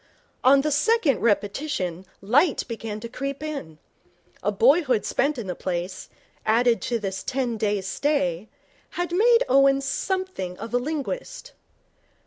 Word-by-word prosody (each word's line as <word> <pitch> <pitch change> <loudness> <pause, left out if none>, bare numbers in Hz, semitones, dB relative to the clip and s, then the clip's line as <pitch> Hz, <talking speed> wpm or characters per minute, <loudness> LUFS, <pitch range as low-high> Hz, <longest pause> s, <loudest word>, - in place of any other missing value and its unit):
On 275 +1 +6
the 305 +2 -1
second 320 - +2
repetition 205 - -1
light 270 - +2
began 225 -2 -5
to 235 - -5
creep 275 +4 -5
in. 275 - -6 0.6
A 205 - 0
boyhood 255 - +3
spent 285 +1 0
in 235 - -4
the 180 - -3
place, 180 +1 -4 0.3
added 235 +2 +3
to 240 - -1
this 195 -3 -4
ten 255 -3 -2
days' 205 -3 -1
stay, 210 - -1 0.5
had 350 -1 -1
made 465 +6 +4
Owen 275 +1 +5
something 275 - -3
of 230 - -8
a 245 - +3
linguist. 405 - -5
255 Hz, 135 wpm, -24 LUFS, 205-300 Hz, 0.6 s, On